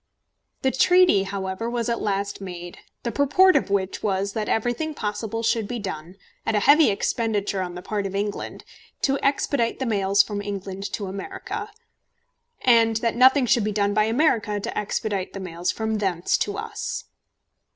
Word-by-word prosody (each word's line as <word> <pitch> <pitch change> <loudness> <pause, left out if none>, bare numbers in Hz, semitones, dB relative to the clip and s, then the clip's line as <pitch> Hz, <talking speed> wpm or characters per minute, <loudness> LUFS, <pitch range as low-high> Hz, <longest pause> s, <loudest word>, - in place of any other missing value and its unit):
The 265 - +3
treaty, 355 - +4
however, 195 +3 -3
was 235 0 -2
at 235 -1 -1
last 200 -1 -2
made, 175 -2 -8 0.2
the 235 - -2
purport 360 +8 +4
of - - +2
which 195 -1 -1
was, 200 -1 -1
that 215 -1 -2
everything 245 +7 -1
possible 215 +1 -3
should 225 -2 +1
be 245 - -3
done, 180 -4 -6 0.3
at 225 - 0
a 210 - +2
heavy 295 +5 +6
expenditure 205 -1 -1
on 180 -1 -4
the 180 - -8
part 205 -2 -2
of 195 - -7
England, 205 +1 -3 0.4
to 275 -1 +2
expedite 275 -3 +1
the 265 - -2
mails 200 -3 +3
from 205 -1 -4
England 195 -1 -5
to 205 - -3
America, 380 - -6 0.9
and 230 -2 +4
that 230 0 -1
nothing 260 +2 +6
should 235 -1 +3
be 210 - 0
done 205 0 +1
by 215 +1 +3
America 225 -4 +1
to 200 - -5
expedite 205 -2 -2
the 195 - -6
mails 175 -1 -4
from 220 -1 -2
thence 185 -4 0
to - - -2
us. 480 0 -4
210 Hz, 170 wpm, -24 LUFS, 195-235 Hz, 0.9 s, heavy